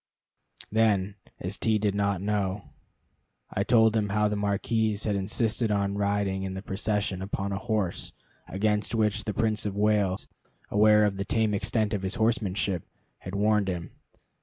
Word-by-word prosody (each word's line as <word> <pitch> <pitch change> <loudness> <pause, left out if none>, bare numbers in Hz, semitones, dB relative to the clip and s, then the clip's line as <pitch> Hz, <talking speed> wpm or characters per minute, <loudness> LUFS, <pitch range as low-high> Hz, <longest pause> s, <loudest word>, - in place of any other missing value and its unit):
Then, 105 -3 +2 0.3
as - - -4
T 110 -1 +2
did 105 -1 0
not 100 -2 0
know, 100 -1 -2 0.8
I 100 - 0
told 110 0 +4
him 105 -2 +1
how 105 +1 +2
the 105 - -1
marquis 105 +1 0
had 105 -2 0
insisted 110 +3 0
on 100 -1 0
riding 100 -1 0
in 95 0 -4
the 95 - -6
procession 100 -1 -2
upon 100 +1 -3
a 100 - -2
horse, 110 -6 -2 0.4
against 105 +2 0
which 110 -1 +1
the 105 - -2
Prince 110 -2 +1
of 100 - -4
Wales, 105 -2 +1 0.4
aware 105 0 +5
of 100 -2 -1
the 100 - -2
tame 110 0 +1
extent 110 +1 0
of 100 - -1
his 95 +3 -1
horsemanship, 105 -6 0 0.4
had 90 +2 -7
warned 105 0 +2
him. 90 -3 -4
105 Hz, 160 wpm, -27 LUFS, 100-110 Hz, 0.8 s, aware